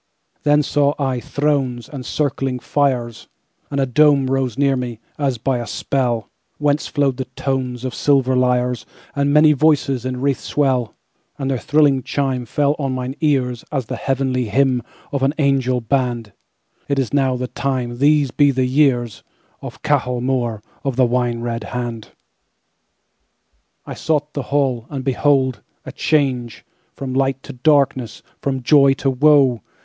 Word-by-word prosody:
Then 150 Hz, 0 st, +3 dB
saw 145 Hz, +1 st, +1 dB
I 130 Hz, -3 st, -1 dB
thronesAnd 135 Hz, -2 st, -2 dB
circling 135 Hz, -3 st, -1 dB
fires, 125 Hz, -4 st, -1 dB, 0.4 s
And 140 Hz, -, -2 dB
a 135 Hz, -, +2 dB
Dome 140 Hz, 0 st, +3 dB
rose 135 Hz, -3 st, -1 dB
near 140 Hz, -1 st, +2 dB
me, 120 Hz, -3 st, -4 dB, 0.2 s
as 135 Hz, -4 st, 0 dB
by 125 Hz, +2 st, -1 dB
a 120 Hz, -, -5 dB
spell, 120 Hz, -1 st, -1 dB, 0.3 s
Whence 145 Hz, 0 st, 0 dB
flowed 140 Hz, -3 st, 0 dB
the 130 Hz, -, -3 dB
tonesOf 130 Hz, -2 st, -2 dB
silver 135 Hz, -3 st, +2 dB
lyres, 125 Hz, -1 st, +1 dB, 0.3 s
And 140 Hz, 0 st, +1 dB
many 150 Hz, +1 st, +6 dB
voices 140 Hz, -4 st, +2 dB
in 130 Hz, 0 st, -3 dB
wreathèd 135 Hz, +1 st, 0 dB
swell; 130 Hz, -6 st, 0 dB, 0.4 s
And 135 Hz, -2 st, -2 dB
their 130 Hz, -, -1 dB
thrilling 145 Hz, -2 st, +3 dB
chimeFell 135 Hz, +2 st, -1 dB
on 135 Hz, -2 st, -1 dB
mine 130 Hz, 0 st, -3 dB
earsAs 135 Hz, -2 st, -1 dB
the -, -, -5 dB
heavenly 130 Hz, -2 st, -1 dB
hymn 125 Hz, +3 st, +2 dB, 0.3 s
of 140 Hz, -, -2 dB
an 135 Hz, +3 st, +1 dB
angel 135 Hz, -4 st, +1 dB
band—"It 120 Hz, +2 st, -4 dB
is 135 Hz, -3 st, -1 dB
now 135 Hz, -2 st, +2 dB
the 125 Hz, 0 st, -3 dB
timeThese 135 Hz, +2 st, 0 dB
be 145 Hz, -1 st, +5 dB
the 130 Hz, -1 st, +1 dB
years, 125 Hz, -4 st, +1 dB, 0.4 s
Of -, -, -9 dB
Cahal 130 Hz, -5 st, +1 dB
Mór 120 Hz, -4 st, -1 dB, 0.2 s
of 135 Hz, -3 st, -2 dB
the 130 Hz, 0 st, +4 dB
Wine 120 Hz, -1 st, 0 dB
red 115 Hz, 0 st, -3 dB
Hand."I 120 Hz, -3 st, -11 dB
sought 150 Hz, -2 st, -1 dB
the 140 Hz, -, -2 dB
hall, 130 Hz, -5 st, 0 dB
And 135 Hz, -3 st, -5 dB
behold!—a 135 Hz, -1 st, 0 dB
changeFrom 130 Hz, -2 st, -2 dB
light 135 Hz, 0 st, 0 dB
to -, -, -9 dB
darkness, 130 Hz, -3 st, +1 dB, 0.2 s
from 135 Hz, -2 st, -2 dB
joy 140 Hz, 0 st, +5 dB
to 135 Hz, 0 st, 0 dB
woe! 135 Hz, -3 st, +4 dB
135 Hz, 140 wpm, -19 LUFS, 125-140 Hz, 0.4 s, many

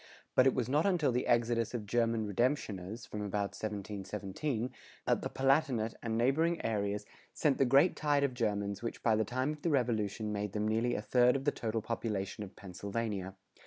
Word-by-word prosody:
But 130 Hz, -, +6 dB
it 130 Hz, -, +3 dB
was 125 Hz, -3 st, 0 dB
not 150 Hz, +8 st, +2 dB
until 170 Hz, -8 st, +2 dB
the 125 Hz, +1 st, 0 dB
exodus 115 Hz, -1 st, +2 dB
of 110 Hz, -3 st, -3 dB
German 115 Hz, 0 st, +1 dB
redemptioners,[100:1] 110 Hz, -2 st, -1 dB
from 105 Hz, -, -5 dB
about 100 Hz, 0 st, -2 dB
1717, 105 Hz, +4 st, -3 dB, 0.3 s
that -, -, +2 dB
the -, -, -3 dB
Palatinate 135 Hz, -5 st, +2 dB
and 115 Hz, -1 st, -1 dB
neighboring 160 Hz, +8 st, +2 dB
areas 105 Hz, -2 st, -1 dB, 0.3 s
sent 145 Hz, -4 st, +2 dB
the 135 Hz, -, +5 dB
great 140 Hz, +8 st, +5 dB
tide 145 Hz, -2 st, +2 dB
of 140 Hz, -2 st, +1 dB
Germans 100 Hz, -4 st, -1 dB
which 115 Hz, -, -5 dB
by 110 Hz, -2 st, +4 dB
the 110 Hz, -, +2 dB
time 130 Hz, +6 st, -1 dB
of 150 Hz, -1 st, -7 dB
the 170 Hz, -, 0 dB
Revolution 110 Hz, -6 st, 0 dB
made 105 Hz, -1 st, -3 dB
them 105 Hz, 0 st, 0 dB
nearly 115 Hz, +3 st, +1 dB
a 105 Hz, -, -3 dB
third 125 Hz, +1 st, +4 dB
of 135 Hz, 0 st, -2 dB
the 145 Hz, -, +4 dB
total 110 Hz, -3 st, -2 dB
population 105 Hz, -3 st, -3 dB
of 95 Hz, -, -10 dB
Pennsylvania. 100 Hz, 0 st, -4 dB
115 Hz, 190 wpm, -33 LUFS, 105-130 Hz, 0.3 s, But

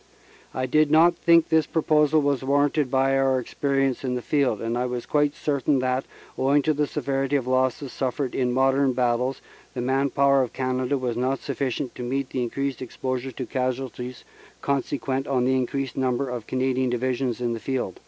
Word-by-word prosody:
"I 130 Hz, -, -2 dB
did 155 Hz, +3 st, +3 dB
not 165 Hz, +3 st, +5 dB
think 170 Hz, -1 st, +4 dB
that -, -, +2 dB
this 160 Hz, -2 st, +3 dB
proposal 155 Hz, -1 st, +2 dB
was 140 Hz, -2 st, 0 dB
warranted 145 Hz, +1 st, +2 dB
by 135 Hz, +1 st, +2 dB
our 135 Hz, -1 st, +2 dB
experience 135 Hz, +1 st, -1 dB
in 125 Hz, -1 st, -1 dB
the 125 Hz, -, -4 dB
field, 140 Hz, -8 st, +1 dB
and 115 Hz, +1 st, -2 dB
I 125 Hz, +1 st, 0 dB
was 125 Hz, -1 st, -4 dB
quite 145 Hz, -1 st, +1 dB
certain 140 Hz, -1 st, 0 dB
that, 130 Hz, +1 st, 0 dB, 0.3 s
owing 140 Hz, +2 st, +3 dB
to 155 Hz, -, +2 dB
the 150 Hz, 0 st, 0 dB
severity 135 Hz, 0 st, -1 dB
of 140 Hz, -, +1 dB
the 130 Hz, -, -3 dB
losses 130 Hz, +1 st, 0 dB
suffered 130 Hz, 0 st, -2 dB
in 125 Hz, -2 st, 0 dB
modern 135 Hz, +1 st, +2 dB
battles, 125 Hz, +1 st, 0 dB, 0.3 s
the 125 Hz, -, -2 dB
man 135 Hz, +3 st, +1 dB
power 140 Hz, 0 st, +3 dB
of 125 Hz, -, -3 dB
Canada 130 Hz, +1 st, -1 dB
was 125 Hz, -3 st, -2 dB
not 130 Hz, +3 st, 0 dB
sufficient 135 Hz, -2 st, -3 dB
to -, -, -8 dB
meet 130 Hz, +2 st, -2 dB
the 130 Hz, -, -2 dB
increased 135 Hz, +2 st, -3 dB
exposure 130 Hz, +1 st, -4 dB
to 130 Hz, +1 st, -5 dB
casualties 125 Hz, -1 st, -4 dB, 0.4 s
consequent 135 Hz, -1 st, -1 dB
on 130 Hz, -3 st, +1 dB
the 130 Hz, +1 st, +2 dB
increased 130 Hz, 0 st, -2 dB
number 130 Hz, 0 st, 0 dB
of 120 Hz, -3 st, -5 dB
Canadian 130 Hz, 0 st, 0 dB
Divisions 125 Hz, 0 st, -1 dB
in 120 Hz, -1 st, -1 dB
the 115 Hz, -, -4 dB
field. 120 Hz, -5 st, -3 dB
130 Hz, 195 wpm, -24 LUFS, 125-140 Hz, 0.4 s, not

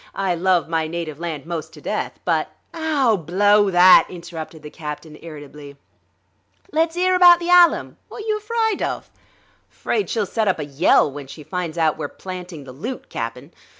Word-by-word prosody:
I 195 Hz, -2 st, 0 dB
love 175 Hz, -1 st, +1 dB
my 160 Hz, -1 st, -1 dB
native 160 Hz, -2 st, -5 dB
land 160 Hz, -4 st, -5 dB
most 165 Hz, -2 st, -5 dB
to -, -, -12 dB
death, -, -, -4 dB
but -, -, 0 dB, 0.2 s
..." -, -, -44 dB
"Ow, 300 Hz, -8 st, +1 dB
blow 205 Hz, +5 st, +3 dB
that!" 180 Hz, 0 st, +7 dB
interrupted 165 Hz, -3 st, -9 dB
the 150 Hz, -, -9 dB
captain 150 Hz, 0 st, -8 dB
irritably. 145 Hz, -3 st, -11 dB, 0.9 s
"Let's 325 Hz, +2 st, 0 dB
'ear 370 Hz, +1 st, +2 dB
about 350 Hz, -1 st, +7 dB
the 345 Hz, 0 st, -2 dB
'Allam. 355 Hz, -1 st, +5 dB
Wot're -, -, -8 dB
you 430 Hz, 0 st, -1 dB
afryd 445 Hz, -1 st, 0 dB
of?" -, -, -4 dB, 0.6 s
"'Fraid 415 Hz, -, -2 dB
she'll 220 Hz, -3 st, 0 dB
set 220 Hz, +3 st, -1 dB
up 190 Hz, -, +2 dB
a 150 Hz, -, -4 dB
yell 140 Hz, 0 st, +3 dB
when 140 Hz, 0 st, -9 dB
she 150 Hz, +3 st, -11 dB
finds 175 Hz, -1 st, -4 dB
out 160 Hz, -2 st, +1 dB
we're -, -, -3 dB
planting 180 Hz, -4 st, -8 dB
the 135 Hz, -, -11 dB
loot, 220 Hz, -, -7 dB
Cap'n. 125 Hz, +6 st, -6 dB
175 Hz, 180 wpm, -21 LUFS, 155-255 Hz, 0.9 s, that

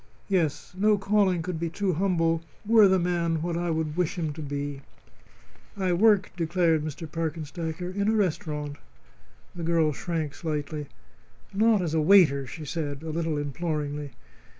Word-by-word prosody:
Yes; 175 Hz, -4 st, 0 dB
no 210 Hz, +2 st, +3 dB
calling 195 Hz, -3 st, +2 dB
could 180 Hz, -2 st, -4 dB
be 170 Hz, 0 st, -1 dB
too 185 Hz, +2 st, -1 dB
humble 165 Hz, -2 st, +1 dB, 0.2 s
were 220 Hz, -1 st, +7 dB
the 190 Hz, 0 st, +4 dB
man 170 Hz, -2 st, 0 dB
what 170 Hz, -1 st, -2 dB
I 175 Hz, 0 st, -1 dB
would 160 Hz, -2 st, -1 dB
wish 180 Hz, +1 st, 0 dB
him 160 Hz, -3 st, -2 dB
to 155 Hz, -, -8 dB
be." 145 Hz, -1 st, -4 dB, 1.0 s
"I 185 Hz, -2 st, +1 dB
work," 205 Hz, +1 st, +4 dB
declared 165 Hz, -2 st, +1 dB
Mr. 155 Hz, +1 st, -5 dB
Parkenstacker, 160 Hz, +2 st, -4 dB
"in 200 Hz, +1 st, 0 dB
a 220 Hz, -, +3 dB
restaurant." 150 Hz, -7 st, -1 dB, 0.8 s
The 175 Hz, -, -7 dB
girl 165 Hz, -2 st, +2 dB
shrank 160 Hz, -2 st, -3 dB
slightly. 150 Hz, 0 st, -4 dB, 0.7 s
"Not 215 Hz, -1 st, +3 dB
as 160 Hz, -3 st, -2 dB
a 160 Hz, -, +2 dB
waiter?" 150 Hz, -6 st, +5 dB
she 155 Hz, +5 st, -8 dB
said, 145 Hz, -1 st, -4 dB
a 160 Hz, -, -4 dB
little 160 Hz, -1 st, -1 dB
imploringly. 145 Hz, -1 st, -3 dB
165 Hz, 155 wpm, -27 LUFS, 150-180 Hz, 1.0 s, were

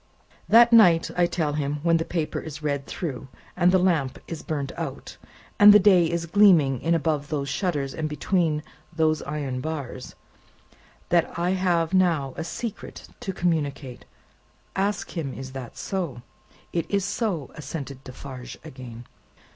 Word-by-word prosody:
"That 235 Hz, +1 st, +7 dB
night, 175 Hz, -8 st, +6 dB
I 175 Hz, -1 st, +3 dB
tell 160 Hz, -4 st, -1 dB
him, 145 Hz, 0 st, -2 dB
when 165 Hz, -1 st, +4 dB
the 165 Hz, -, -2 dB
paper 165 Hz, -3 st, -2 dB
is 150 Hz, -1 st, -8 dB
read 140 Hz, -2 st, -2 dB
through, 140 Hz, -6 st, -5 dB, 0.3 s
and 180 Hz, 0 st, +4 dB
the 185 Hz, -, +5 dB
lamp 165 Hz, -8 st, +1 dB
is 165 Hz, -, -6 dB
burnt 145 Hz, -4 st, -3 dB
out, -, -, -6 dB, 0.4 s
and 205 Hz, 0 st, +10 dB
the 205 Hz, -, +9 dB
day 185 Hz, -4 st, +5 dB
is 170 Hz, 0 st, -2 dB
gleaming 165 Hz, -, +4 dB
in 170 Hz, +1 st, +2 dB
above 150 Hz, -3 st, -1 dB
those 140 Hz, -3 st, -3 dB
shutters 145 Hz, -4 st, -1 dB
and 155 Hz, -1 st, -3 dB
between 150 Hz, 0 st, 0 dB, 0.3 s
those 155 Hz, -2 st, +1 dB
iron 140 Hz, -3 st, -4 dB
bars, 140 Hz, -4 st, -6 dB, 0.9 s
that 170 Hz, -1 st, +1 dB
I 175 Hz, +1 st, +1 dB
have 180 Hz, -2 st, +1 dB
now 165 Hz, -8 st, +2 dB
a 160 Hz, -, -4 dB
secret 225 Hz, +6 st, -7 dB
to 195 Hz, -, -4 dB
communicate. 150 Hz, -8 st, -2 dB, 0.7 s
Ask 200 Hz, +2 st, -1 dB
him, 145 Hz, -6 st, -3 dB
is 130 Hz, 0 st, -7 dB
that 130 Hz, -1 st, -8 dB
so." 140 Hz, -5 st, -4 dB, 0.5 s
"It 170 Hz, -, -2 dB
is 200 Hz, -2 st, 0 dB
so," 200 Hz, -, -2 dB
assented 140 Hz, -2 st, -7 dB
Defarge 130 Hz, -1 st, -9 dB
again. 125 Hz, -6 st, -10 dB
160 Hz, 155 wpm, -25 LUFS, 140-180 Hz, 0.9 s, and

